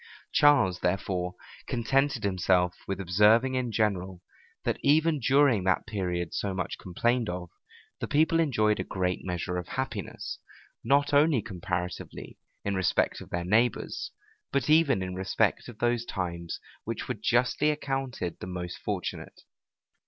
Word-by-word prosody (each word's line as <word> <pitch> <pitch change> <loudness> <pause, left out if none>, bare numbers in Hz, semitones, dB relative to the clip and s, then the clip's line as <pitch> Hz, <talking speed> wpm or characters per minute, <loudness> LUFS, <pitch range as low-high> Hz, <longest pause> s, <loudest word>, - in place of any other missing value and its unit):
Charles, 130 - +4
therefore, 90 -1 -1 0.3
contented 135 +2 +1
himself 90 -2 +2
with 95 -1 -3
observing 105 +8 +4
in 125 -2 -1
general, 95 -4 -1 0.4
that - - -1
even 155 +2 +3
during 130 -4 +4
that 95 -1 +2
period 90 -5 -2
so 100 -2 -2
much 90 - -3
complained 120 +5 0
of, 90 -1 -5 0.5
the - - -3
people 160 +2 +3
enjoyed 110 -9 +2
a - - 0
great 90 -1 -2
measure 90 0 -3
of 90 - -4
happiness, 130 0 -4 0.4
not 145 +1 +2
only 145 -1 +5
comparatively, 90 -2 -5 0.3
in 100 - 0
respect 95 -2 +1
of - - -11
their 85 0 -2
neighbors, 115 +6 +1 0.4
but 140 +2 +1
even 145 -10 +4
in 90 0 -4
respect 95 +1 0
of 115 - -11
those 120 0 +1
times 85 -6 -4 0.2
which - - -4
were - - -1
justly 125 +5 +2
accounted 135 - -3
the - - -6
most 90 -1 -5
fortunate. - - -5
105 Hz, 140 wpm, -28 LUFS, 90-130 Hz, 0.5 s, only